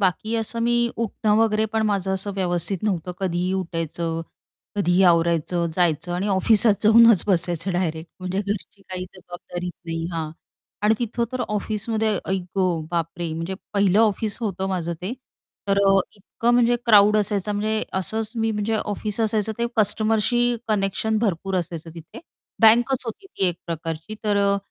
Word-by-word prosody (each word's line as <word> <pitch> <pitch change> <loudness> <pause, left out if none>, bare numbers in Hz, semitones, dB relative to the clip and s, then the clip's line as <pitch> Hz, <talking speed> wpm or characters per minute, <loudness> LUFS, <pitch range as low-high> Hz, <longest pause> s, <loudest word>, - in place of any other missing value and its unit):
बाकी 200 +4 0
असं 225 +1 -3
मी 240 0 +2 0.2
उठणं 220 -1 0
वगैरे 220 -1 +2
पण 220 0 +1
माझं 195 -2 0
असं 200 +1 -3
व्यवस्थित 180 0 -1
नव्हतं, 185 -4 -1
कधीही 180 0 -1
उठायचं, 165 -2 -3 0.6
कधीही 185 -2 +3
आवरायचं 170 0 +2
जायचं. 175 -1 +1
आणि 185 +4 -1
ऑफिसात 205 +3 +4
जाऊनच 225 -2 +7
बसायचं 175 -1 +1
डायरेक्ट 165 -2 -2
म्हणजे 185 +1 -2
घरची 200 0 -5
काही 185 -1 -6
जबाबदारीच 180 -1 -7
नाही. 165 -1 -3
हां, 160 -2 -3 0.5
आणि 210 +1 +4
तिथं 235 0 -1
तर 255 - -3
ऑफिसमध्ये 215 0 -1
आई 190 0 +1 0.2
ग 180 -4 +1
बापरे, 170 0 -2
म्हणजे 165 +4 -4 0.2
पहिलं 200 -1 +3
ऑफिस 215 -1 +1
होतं 195 -4 -2
माझं 170 -3 -2
ते. 195 - -3 0.6
तर 195 - +3
अ, 195 0 +5 0.2
इतकं 230 +4 -2
म्हणजे 240 0 +4
क्राउड 210 -1 +6
असायचा 205 0 0
म्हणजे 215 +1 -1
असंच 215 +3 -2
मी 225 0 +1
म्हणजे 210 +1 -1
ऑफिस 210 +1 -3
असायचं 220 0 +1
ते 235 - +1
कस्टमरशी 225 +3 +2
कनेक्शन 215 +1 0
भरपूर 195 -3 -1
असायचं 170 -2 -4
तिथे. 165 - -11 0.4
बँकच 240 +4 +5
होती 245 - -7
ती 285 - -2
एक 175 - -3
प्रकारची. 165 +3 -5
तर 205 -1 +2
अ, 200 0 +3
200 Hz, 155 wpm, -23 LUFS, 175-220 Hz, 0.6 s, जाऊनच